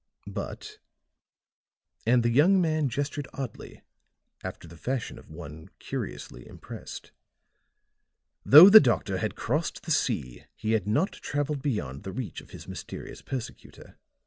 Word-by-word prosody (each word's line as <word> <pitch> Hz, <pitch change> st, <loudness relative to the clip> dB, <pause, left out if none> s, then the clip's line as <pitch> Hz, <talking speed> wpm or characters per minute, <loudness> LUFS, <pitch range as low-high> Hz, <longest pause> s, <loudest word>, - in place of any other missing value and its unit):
"But," -, -, -7 dB, 1.3 s
and 120 Hz, 0 st, +4 dB
the 120 Hz, -, +2 dB
young 170 Hz, +10 st, +5 dB
man 155 Hz, -4 st, +1 dB
gestured 145 Hz, +2 st, -3 dB
oddly, 130 Hz, -5 st, -7 dB, 0.6 s
after -, -, -7 dB
the 85 Hz, -, -13 dB
fashion 125 Hz, +8 st, -4 dB
of -, -, -18 dB
one 80 Hz, -1 st, -10 dB
curiously -, -, -6 dB
impressed, -, -, -10 dB, 1.3 s
"though 155 Hz, +7 st, +11 dB
the 215 Hz, +2 st, +11 dB
doctor 105 Hz, -, +1 dB
had 105 Hz, 0 st, -2 dB
crossed 150 Hz, +7 st, -2 dB
the 165 Hz, -, -4 dB
sea 75 Hz, -, -1 dB
he 110 Hz, -, -3 dB
had 105 Hz, -3 st, +1 dB
not 145 Hz, -, +1 dB
traveled 145 Hz, 0 st, -3 dB
beyond 75 Hz, -, -3 dB
the 95 Hz, -, -6 dB
reach 125 Hz, -2 st, -5 dB
of -, -, -18 dB
his -, -, -11 dB
mysterious -, -, -8 dB
persecutor. 130 Hz, -4 st, -8 dB
125 Hz, 135 wpm, -27 LUFS, 95-145 Hz, 1.3 s, though